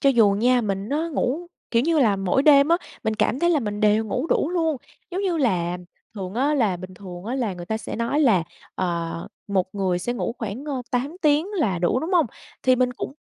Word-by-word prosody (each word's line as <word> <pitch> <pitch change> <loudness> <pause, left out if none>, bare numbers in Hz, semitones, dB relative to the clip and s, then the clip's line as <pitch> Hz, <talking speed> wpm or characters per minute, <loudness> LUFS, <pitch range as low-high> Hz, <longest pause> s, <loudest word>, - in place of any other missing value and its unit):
Cho 275 - +5
dù 225 -5 +5
nha 245 +4 +3
mình 200 -1 -2
nó 310 +5 -1
ngủ 305 +3 -1 0.2
kiểu 230 0 +3
như 325 +2 +2
là, 210 -6 +4
mỗi 195 +8 +1
đêm 285 0 +6
á, 340 - +5 0.3
mình 220 - +1
cảm 225 +3 +1
thấy 345 0 +3
là 305 -4 +3
mình 210 -2 -3
đều 215 +1 +3
ngủ 250 +8 -2
đủ 325 - +1
luôn, 325 -4 +1 0.3
giống 370 +2 -2
như 365 -4 0
là, 180 - 0 0.4
thường 190 -1 -6
á 280 +5 +2
là 220 -10 +2
bình 185 +1 -9
thường 180 -2 -9
á 240 +4 -3
là 235 -8 -1
người 175 -1 -8
ta 220 - -1
sẽ - - -6
nói 235 +6 0
là, 220 - +4 0.3
ờ, 170 -2 -3 0.2
một 190 -1 0
người 190 -3 0
sẽ 240 +7 -2
ngủ 240 -1 -3
khoảng, 225 +4 -5
ơ, 275 -4 -3
8 270 +7 -1
tiếng 300 +2 +3
là 195 - +1
đủ, 175 +9 +1
đúng 320 - -3
không? 345 -5 +4 0.4
Thì 255 -1 +4
mình 250 0 +2
cũng 250 - -5
235 Hz, 235 wpm, -23 LUFS, 195-285 Hz, 0.4 s, đêm